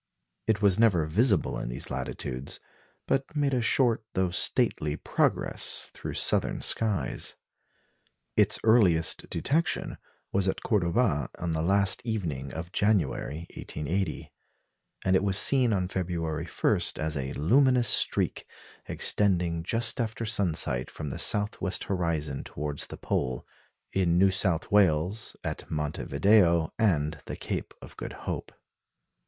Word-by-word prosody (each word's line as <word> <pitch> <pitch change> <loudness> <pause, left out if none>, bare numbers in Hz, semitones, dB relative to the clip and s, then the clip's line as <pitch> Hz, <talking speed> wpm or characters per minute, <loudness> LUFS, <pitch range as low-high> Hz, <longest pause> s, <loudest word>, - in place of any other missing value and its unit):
It 105 -2 +1
was 100 0 +4
never 95 -9 +4
visible 100 - +1
in - - -4
these - - -5
latitudes, 65 +2 -5 0.5
but 135 +3 -1
made 145 -2 +1
a 125 - +1
short 115 -1 +2
though 95 -1 +1
stately 75 -3 +1
progress - - 0
through - - -6
southern - - +1
skies. 110 -4 0 1.0
Its - - +3
earliest 95 -8 +3
detection 160 +4 -1 0.3
was 95 -1 +1
at 95 - -2
Cordoba 85 - +1
on 85 -1 -3
the 80 0 -1
last 100 +6 +2
evening 85 - -3
of 85 +2 -7
January, 85 -6 0
1880; 90 +6 -4 0.7
and 95 0 +3
it 95 - +2
was 100 -1 +2
seen 125 +2 +6
on 95 -3 0
February 85 -3 -3
1, - - +1 0.2
as 75 0 -2
a 65 -1 -3
luminous 125 - +3
streak, - - +1 0.4
extending 90 -5 +1
just 115 +7 0
after 115 0 -3
sunset 85 - +1
from 75 -3 -6
the - - -6
south 105 0 0
west 95 -1 -1
horizon 80 -7 -2
towards 75 0 -4
the - - -9
pole, 65 -1 -2 0.5
in 90 -3 +2
New 95 +1 +5
South 95 -3 +1
Wales, 95 +1 +2
at - - -5
Monte 75 -1 -3
Video, 85 +1 +3
and 80 -8 +1
the - - -4
Cape - - -5
of - - -12
Good - - -6
Hope. - - -4
95 Hz, 135 wpm, -28 LUFS, 80-110 Hz, 1.0 s, seen